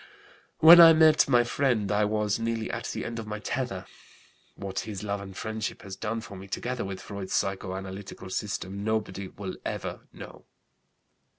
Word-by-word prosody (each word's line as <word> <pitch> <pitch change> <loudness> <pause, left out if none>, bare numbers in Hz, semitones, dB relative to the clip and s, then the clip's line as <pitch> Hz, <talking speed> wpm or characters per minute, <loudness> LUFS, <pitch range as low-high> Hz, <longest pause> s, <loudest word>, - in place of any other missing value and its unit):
When 170 +2 +11
I 165 -1 +10
met 155 -1 +5
my 120 0 +5
friend 120 -5 0
I 105 0 +3
was 105 0 0
nearly 115 -1 -2
at - - -4
the - - -4
end 115 0 -4
of 110 - -7
my 105 0 -4
tether. 105 -4 -3 0.7
What 95 -1 -4
his 105 -3 -6
love 100 -1 -3
and 95 -1 -10
friendship 110 -1 -4
has 95 -1 -7
done 115 +3 -3
for 110 -3 -10
me, 95 +1 -10
together 125 +5 -3
with 95 -1 -5
Freud's 100 -2 -6
psychoanalytical 95 0 -4
system, 100 0 -4
nobody 105 -3 -2
will 95 -1 -7
ever - - -5
know. - - -12
105 Hz, 170 wpm, -27 LUFS, 95-115 Hz, 0.7 s, When